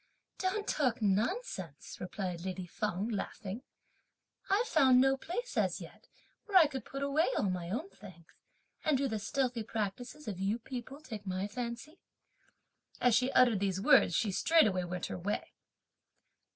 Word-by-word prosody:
"Don't 395 +3 -1
talk 255 -6 +1
nonsense!" 205 - -1
replied 180 -2 -4
lady 185 -1 -4
Feng 200 +2 -2
laughing; 205 0 -4 0.9
"I've 410 +5 +3
found 265 - +5
no 270 +1 +5
place, 475 - -5
as - - +1
yet, - - -12 0.4
where 400 -3 +4
I 340 - +9
could 270 -5 -4
put 275 0 -5
away 285 +4 +2
all 195 - +1
my 175 -2 -4
own 250 - -2
things; 180 -5 -13 0.6
and 305 -3 +3
do 275 +1 +1
the 220 -4 -2
stealthy 245 +3 -1
practices 225 +7 -4
of 195 -4 -4
you 200 +4 0
people 255 +4 -7
take 215 -9 -8
my 185 +2 -1
fancy?" 235 - -6 1.0
As 245 -2 +4
she 255 +4 +3
uttered 240 -5 +5
these 190 -1 0
words 175 - +5
she 215 -4 +1
straightway 200 - +3
went 180 0 -4
her - - -5
way. 200 +4 -3
230 Hz, 155 wpm, -32 LUFS, 195-275 Hz, 1.0 s, I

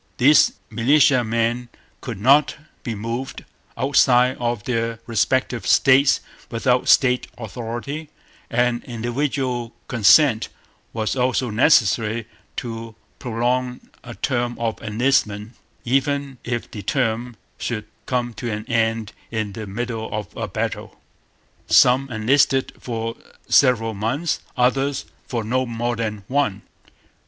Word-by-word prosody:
These 145 +4 +5 0.2
militiamen 120 -1 +2 0.3
could 115 -6 -6
not 140 +6 +4 0.3
be 115 - -4
moved 115 +5 -5 0.3
outside 130 -2 +4
of 120 -3 -2
their 115 -2 -1
respective 120 +2 0
States 135 +1 +5 0.3
without 125 +2 +1
State 125 -2 +4
authority; 120 +7 -6 0.4
and 120 0 +1
individual 120 0 -2
consent 115 - +4 0.4
was 110 0 -2
also 125 -1 0
necessary 115 -2 +3 0.3
to 115 -2 -6 0.2
prolong 125 +1 -1 0.2
a 120 -2 -9
term 120 -2 -1
of 115 -1 -3
enlistment, 110 -2 0 0.3
even 135 +1 0
if 120 -1 -4
the 105 - -6
term 120 +2 -1 0.2
should 110 -3 -3 0.2
come 120 -2 -1
to 120 +3 -5
an 105 +1 -4
end 115 -2 0 0.2
in 110 -3 -3
the 110 +1 -7
middle 115 +2 -4
of 105 -3 -5
a - - -3
battle. - - -4 0.7
Some 130 +2 +5
enlisted 130 +4 +2
for 115 -1 -4 0.3
several 115 -4 +4
months; 120 +11 -1 0.2
others 135 +3 +1 0.2
for 120 -4 -2
no 130 +4 0
more 120 +1 -2
than 105 -3 -4
one. 125 -8 0
120 Hz, 115 wpm, -22 LUFS, 115-130 Hz, 0.7 s, These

